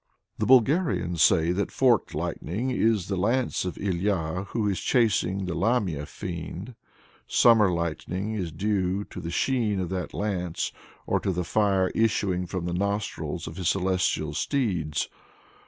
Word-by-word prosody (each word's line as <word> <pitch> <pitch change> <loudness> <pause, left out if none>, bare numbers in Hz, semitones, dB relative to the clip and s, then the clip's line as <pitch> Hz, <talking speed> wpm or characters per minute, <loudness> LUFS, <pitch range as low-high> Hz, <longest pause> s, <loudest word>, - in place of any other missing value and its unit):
The - - 0
Bulgarians 120 - +3
say 80 +2 +5
that 95 +3 -1
forked 125 -4 +2
lightning 115 +10 -2
is 110 -6 +1
the 100 - -1
lance 115 +4 0
of 90 - -4
Ilya 95 -2 -1
who 110 -3 -1
is 100 -3 0
chasing 100 -6 +1
the 90 - -3
Lamia 90 - 0
fiend: 90 +5 -6 0.5
summer 110 -5 +5
lightning 90 +5 -2
is 90 -6 -3
due 95 +2 0
to - - -9
the 85 - -5
sheen 110 +1 0
of 90 -2 -2
that 90 -1 -3
lance, 90 -5 -2 0.3
or - - +1
to 95 - -1
the 90 0 -1
fire 95 -1 +2
issuing 95 -5 +1
from 90 -1 -4
the 90 - -2
nostrils 100 +3 -2
of - - -8
his 90 -4 0
celestial 90 -5 0
steeds. 90 - -1
95 Hz, 150 wpm, -26 LUFS, 90-110 Hz, 0.5 s, say